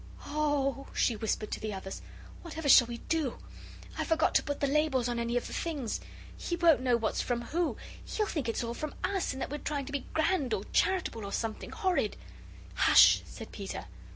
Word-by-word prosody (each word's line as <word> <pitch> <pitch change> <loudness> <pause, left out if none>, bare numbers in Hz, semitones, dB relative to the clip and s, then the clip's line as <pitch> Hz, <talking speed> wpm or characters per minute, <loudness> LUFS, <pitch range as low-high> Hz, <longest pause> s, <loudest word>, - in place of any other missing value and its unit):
"Oh!" 290 -2 0
she 235 - +2
whispered 215 -1 -2
to - - -2
the 215 -2 -4
others, 190 0 -7 0.4
"whatever 320 -3 -5
shall 250 -3 +8
we 235 0 -5
do? 315 -7 0 0.6
I - - +1
forgot 325 -2 +2
to - - +5
put 285 -1 -4
the - - +1
labels 280 -3 +2
on 240 -1 -1
any 235 +1 0
of 245 - -2
the - - -7
things! 285 -9 -2 0.4
He 345 - -3
won't 335 -5 +5
know 250 -2 +3
what's 225 -2 -1
from 240 -1 -1
who. 335 +7 -1 0.3
He'll 425 - -1
think 295 - -2
it's 230 - -1
all 235 0 -3 0.3
US, 390 -2 0
and 265 - -7
that - - -5
we're 295 - -3
trying 285 -2 -3
to 280 - -8
be 280 -2 -3
grand 315 -7 +2
or 195 - -4
charitable 365 - +1
or 200 - -5
something 225 0 -3
horrid." 360 - 0 0.6
"Hush!" - - +7
said 225 - -9
Peter. 200 -2 -6
275 Hz, 200 wpm, -30 LUFS, 235-315 Hz, 0.6 s, shall